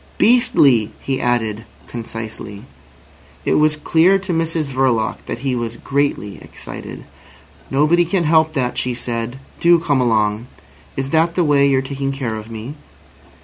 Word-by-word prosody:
"Beastly!" 155 - +4
he 135 -1 -2
added 115 -3 0 0.2
concisely. 115 -3 -7 0.8
It - - +2
was 155 0 +3
clear 165 +5 +4
to 190 -2 -4
Mrs 165 -1 0
Verloc 130 -5 0
that - - -3
he 130 -2 +1
was 115 -1 -4
greatly 140 -8 -2
excited. - - -9 0.7
"Nobody 155 +6 +3
can 175 +1 0
help 160 0 +3
that," 125 -4 -1
she 125 -1 -2
said. 120 +1 -4 0.2
"Do 170 0 +5
come 145 -5 +1
along. 110 -1 +1 0.5
Is 135 0 -2
that 165 +1 +2
the 180 - +2
way 145 -2 +4
you're 135 -1 +2
taking 135 0 -3
care 135 -5 -3
of 110 +1 -8
me?" 115 +4 -7
135 Hz, 145 wpm, -19 LUFS, 115-160 Hz, 0.8 s, Do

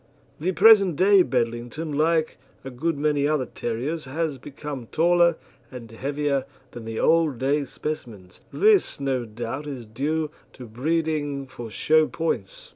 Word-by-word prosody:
The 175 +5 0
present 195 -3 +6
day 195 +3 +5
Bedlington, 120 +3 -2
like 160 +1 +1 0.3
a 135 - -6
good 150 +5 -2
many 145 -1 +1
other 150 -4 0
terriers, 130 +10 -4
has 150 0 -3
become 140 -2 -7
taller 170 +2 +3 0.3
and 120 -3 -10
heavier 140 +3 -1 0.3
than 120 -2 -9
the 115 0 -4
old 160 -5 +3
day 140 +3 0
specimens. 115 -10 -7
This 415 - +3
no 135 -3 -1
doubt 120 +6 -6
is 130 -5 -6
due 150 +7 -2 0.2
to 125 - -10
breeding 145 +3 -1
for 120 -3 -9
show 155 +7 +3
points. 120 - -4
145 Hz, 140 wpm, -24 LUFS, 125-160 Hz, 0.3 s, present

